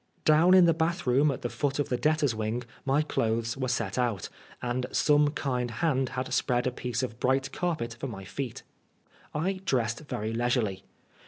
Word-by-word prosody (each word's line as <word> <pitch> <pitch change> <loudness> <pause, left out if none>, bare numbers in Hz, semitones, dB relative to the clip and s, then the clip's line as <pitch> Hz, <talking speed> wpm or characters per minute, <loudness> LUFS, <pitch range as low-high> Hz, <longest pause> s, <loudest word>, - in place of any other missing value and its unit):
Down 160 +4 +6
in 185 -2 +8
the 165 - +5
bathroom 160 -4 +2
at 135 - -3
the - - +1
foot 145 -2 -1
of 145 - -1
the 125 - +1
debtors' 150 -1 +2
wing 110 +2 -2 0.2
my 140 +3 +3
clothes 115 -4 -1
were 130 -1 -2
set 115 -3 -1
out, 115 -7 -1 0.3
and 125 +1 -2
some 150 -1 +4
kind 125 -4 -2
hand 130 +1 0
had 130 0 -2
spread 125 -1 +1
a 130 - +1
piece 125 +1 -3
of 120 -2 -4
bright 135 +1 +1
carpet 140 -11 -2
for 135 - -3
my 100 -6 -7
feet. 125 +5 -5 0.7
I 185 +5 -1
dressed 120 -9 0
very 110 -7 -4
leisurely. 115 -5 0
130 Hz, 180 wpm, -28 LUFS, 120-150 Hz, 0.7 s, in